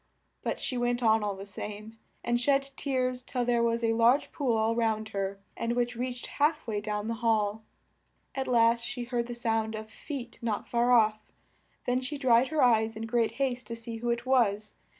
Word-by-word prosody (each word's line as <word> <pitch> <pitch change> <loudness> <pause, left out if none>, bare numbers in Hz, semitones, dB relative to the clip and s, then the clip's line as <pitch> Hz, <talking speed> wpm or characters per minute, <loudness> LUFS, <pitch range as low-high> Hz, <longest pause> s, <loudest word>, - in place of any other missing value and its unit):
But - - -2
she 255 - -2
went 240 0 0
on 220 -1 +4
all 205 -1 -1
the 195 +1 -8
same, 210 +2 -8 0.2
and 240 0 +1
shed 275 +1 +2
tears 255 -3 -1
till 250 -1 -2
there 240 -1 +2
was 235 0 +1
a 225 0 +3
large 235 +5 +3
pool 250 -6 0
all 220 +1 +1
round 220 -2 0
her, 195 -1 -3 0.2
and 230 0 -1
which 245 0 0
reached 245 0 -3
half 300 +1 0
way 210 -3 -2
down 210 0 -3
the 230 - -1
hall. 220 -2 +1 0.7
At 265 -1 -3
last 235 -1 +4
she 245 +1 -4
heard 240 -1 -2
the 240 - -5
sound 225 -2 -1
of 215 0 -7
feet 250 -2 -7
not 225 -3 -2
far 240 +1 +2
off, 215 -3 +4 0.7
then 250 +1 +1
she 285 +3 -4
dried 255 -2 +4
her 305 -1 +1
eyes 225 -2 +3
in 220 +1 -4
great 225 0 +1
haste 255 -1 -1
to 230 - -4
see 230 0 -6
who 240 +1 -3
it 235 +1 -1
was. 220 -5 +2
235 Hz, 205 wpm, -29 LUFS, 220-250 Hz, 0.7 s, on